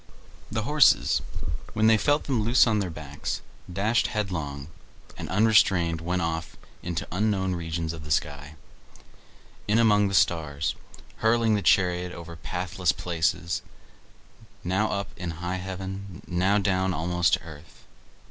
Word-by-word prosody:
The 110 Hz, 0 st, -1 dB
horses, 150 Hz, +4 st, +4 dB, 0.5 s
when 110 Hz, 0 st, +2 dB
they 110 Hz, 0 st, +7 dB
felt 145 Hz, +7 st, +2 dB
them 130 Hz, -6 st, 0 dB
loose 115 Hz, +4 st, +5 dB
on 110 Hz, -3 st, +2 dB
their 95 Hz, -3 st, -2 dB
backs, 75 Hz, -3 st, -5 dB, 0.3 s
dashed 105 Hz, +6 st, +1 dB
headlong, 80 Hz, -, -3 dB, 0.5 s
and -, -, -7 dB
unrestrained 95 Hz, -5 st, +3 dB
went 90 Hz, +1 st, -1 dB
off 80 Hz, -1 st, -3 dB, 0.2 s
into 85 Hz, -2 st, -4 dB
unknown 95 Hz, 0 st, 0 dB
regions 80 Hz, -1 st, -3 dB
of 80 Hz, -2 st, -8 dB
the 75 Hz, -, -9 dB
sky, 75 Hz, -1 st, -2 dB, 1.1 s
in 105 Hz, +2 st, +3 dB
among 105 Hz, -3 st, +4 dB
the 100 Hz, -, -1 dB
stars, 75 Hz, -5 st, +1 dB, 0.4 s
hurling 115 Hz, 0 st, +3 dB
the 105 Hz, -, +1 dB
chariot 90 Hz, -2 st, +2 dB
over 85 Hz, 0 st, -9 dB
pathless 90 Hz, +2 st, -1 dB
places, 85 Hz, 0 st, -1 dB, 1.0 s
now 95 Hz, +4 st, +1 dB
up 100 Hz, 0 st, -3 dB
in 90 Hz, -3 st, -4 dB
high 90 Hz, +2 st, -3 dB
heaven, 95 Hz, 0 st, -6 dB
now 95 Hz, +3 st, +2 dB
down 95 Hz, -2 st, +1 dB
almost 90 Hz, +2 st, +1 dB
to -, -, +4 dB
the -, -, -16 dB
earth. 80 Hz, 0 st, -13 dB
90 Hz, 140 wpm, -26 LUFS, 85-105 Hz, 1.1 s, they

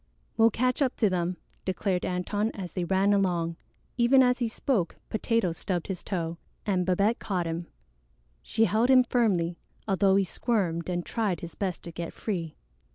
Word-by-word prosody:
"We'll 225 Hz, 0 st, +6 dB
catch 250 Hz, +5 st, 0 dB
up 265 Hz, -3 st, +2 dB
to 210 Hz, -5 st, +2 dB
them," 180 Hz, 0 st, -1 dB, 0.3 s
declared 185 Hz, 0 st, -1 dB
Antone 205 Hz, +4 st, -1 dB
as 185 Hz, -4 st, -6 dB
they 180 Hz, -2 st, -1 dB
ran 195 Hz, +3 st, +3 dB
along. 175 Hz, -4 st, +1 dB, 0.4 s
Even 255 Hz, +2 st, +6 dB
as 250 Hz, 0 st, +2 dB
he 240 Hz, -, +1 dB
spoke, 225 Hz, -5 st, -1 dB, 0.2 s
Potato 225 Hz, -4 st, +1 dB
stubbed 175 Hz, +1 st, -3 dB
his 190 Hz, -3 st, -5 dB
toe, 170 Hz, -3 st, -3 dB, 0.3 s
and 185 Hz, -3 st, +1 dB
Babette 200 Hz, +5 st, +2 dB
caught 180 Hz, -4 st, -2 dB
him. 165 Hz, +1 st, -3 dB, 0.7 s
She 225 Hz, 0 st, +2 dB
held 225 Hz, +3 st, +2 dB
him 260 Hz, -1 st, +7 dB
firmly, 190 Hz, -9 st, +1 dB, 0.3 s
although 195 Hz, -1 st, +3 dB
he 195 Hz, -, +4 dB
squirmed 185 Hz, -5 st, -1 dB
and 175 Hz, -1 st, -2 dB
tried 205 Hz, -7 st, -1 dB
his 170 Hz, -, -7 dB
best 190 Hz, -3 st, -3 dB
to 170 Hz, -, -7 dB
get 170 Hz, 0 st, -6 dB
free. 170 Hz, -7 st, -4 dB
190 Hz, 170 wpm, -28 LUFS, 175-225 Hz, 0.7 s, him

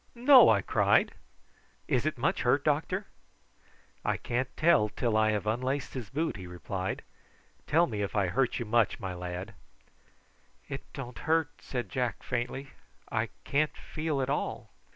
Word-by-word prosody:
No!" 255 Hz, +1 st, +8 dB
I 100 Hz, -3 st, +4 dB
cried. -, -, +3 dB, 0.7 s
"Is -, -, +1 dB
it -, -, -1 dB
much -, -, 0 dB
hurt, -, -, +2 dB
doctor?" -, -, 0 dB, 1.0 s
"I -, -, 0 dB
can't 125 Hz, +2 st, -2 dB
tell 155 Hz, -10 st, +4 dB
till 115 Hz, +1 st, -1 dB
I 110 Hz, 0 st, +4 dB
have 105 Hz, -1 st, 0 dB
unlaced 130 Hz, +5 st, -1 dB
his 125 Hz, -6 st, -5 dB
boot," 155 Hz, 0 st, -1 dB
he 90 Hz, -2 st, -8 dB
replied. 90 Hz, +2 st, -4 dB, 0.6 s
"Tell 170 Hz, +3 st, +4 dB
me 110 Hz, -9 st, -4 dB
if 100 Hz, -, -3 dB
I 100 Hz, -2 st, +3 dB
hurt 120 Hz, +8 st, +1 dB
you 120 Hz, -, -3 dB
much, 115 Hz, 0 st, +2 dB
my 95 Hz, -1 st, -4 dB
lad." 90 Hz, +4 st, -6 dB, 1.1 s
"It 135 Hz, -, -7 dB
don't 125 Hz, -4 st, -7 dB
hurt," 160 Hz, -2 st, +3 dB
said 125 Hz, -5 st, -4 dB
Jack 125 Hz, 0 st, -2 dB
faintly. 125 Hz, +3 st, -3 dB, 0.4 s
"I -, -, 0 dB
can't 150 Hz, +2 st, 0 dB
feel 155 Hz, -3 st, -2 dB
at 130 Hz, -, -3 dB
all." 145 Hz, -, -3 dB
120 Hz, 155 wpm, -30 LUFS, 105-140 Hz, 1.1 s, No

